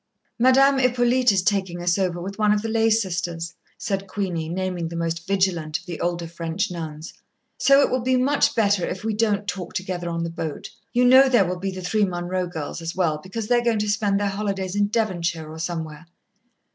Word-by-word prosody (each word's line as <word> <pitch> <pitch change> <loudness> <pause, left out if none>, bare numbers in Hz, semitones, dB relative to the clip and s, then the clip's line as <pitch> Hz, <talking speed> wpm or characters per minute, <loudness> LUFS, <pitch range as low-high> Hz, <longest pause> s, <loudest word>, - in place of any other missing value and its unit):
"Madame 265 +2 +5
Hippolyte 250 -1 +3
is 190 -2 +1
taking 190 -3 0
us 175 +2 +1
over, 180 -2 0
with 195 +4 -7
one 210 -1 +3
of 210 0 +1
the - - -2
lay 225 0 +2
sisters," 175 -6 -1 0.2
said 195 -1 -3
Queenie, 180 -5 -3
naming 180 -1 -2
the 170 - -7
most 165 +1 -3
vigilant 180 -6 0
of - - -19
the 170 -3 -6
older 175 -1 -1
French 165 +3 -3
nuns. 160 -2 -7 0.5
"So 275 0 +6
it - - +2
will 255 0 +1
be 255 +1 +2
much 275 +3 +2
better 205 -4 +2
if 185 - -4
we 220 0 -1
don't 210 -2 0
talk 180 -2 -5
together 180 -2 -3
on 170 0 -2
the 170 - -3
boat. 160 -3 -5 0.2
You 245 +1 +3
know 260 +2 +7
there 240 -7 +4
will 180 0 -3
be 195 +1 -2
the 185 -1 -6
three 210 +4 +1
Munroe 180 -1 -2
girls 160 -1 -6
as 165 +1 -5
well, 165 -5 +1
because 200 +6 -6
they 245 +1 +4
are - - -4
going 235 -2 +2
to 210 0 -1
spend 205 -1 +1
their 205 0 0
holidays 195 -2 -3
in 205 0 +2
Devonshire 175 -7 -1
or 160 - -9
somewhere." 160 -1 -5
190 Hz, 215 wpm, -23 LUFS, 170-215 Hz, 0.5 s, know